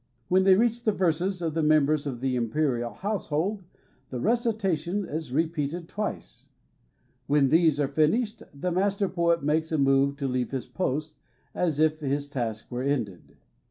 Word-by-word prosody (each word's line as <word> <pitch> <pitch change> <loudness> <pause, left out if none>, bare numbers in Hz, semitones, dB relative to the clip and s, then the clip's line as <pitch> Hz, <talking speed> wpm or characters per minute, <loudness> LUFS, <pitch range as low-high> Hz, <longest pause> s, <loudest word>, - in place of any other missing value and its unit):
When 190 +1 +4
they 190 -1 +7
reach 235 +3 +1
the 215 - +3
verses 180 -1 0
of 160 -2 -1
mem 155 -1 +5
bers 150 0 0
of 125 -4 -5
the 130 -1 0
imperial 120 0 0
household, 195 -1 -2 0.5
the 125 - -4
recitation 205 - 0
is 155 -4 -5
repeated 160 +2 -1
twice. 200 - -5 0.8
When 140 -1 +3
these 160 -1 +4
are 145 - +2
finished, 185 - +1
the 160 +6 -3
Master 195 +2 +1
i>oet 170 -3 +1
makes 160 +2 0
a 160 - +1
move 135 0 +3
to 140 -2 -2
leave 125 -1 -1
his 130 -4 -4
post, 155 -3 -3 0.3
as 160 -5 0
if 155 0 +3
his 145 -1 -2
task 115 -6 -4
were 125 0 -3
ended. 100 - -3
155 Hz, 160 wpm, -27 LUFS, 135-185 Hz, 0.8 s, they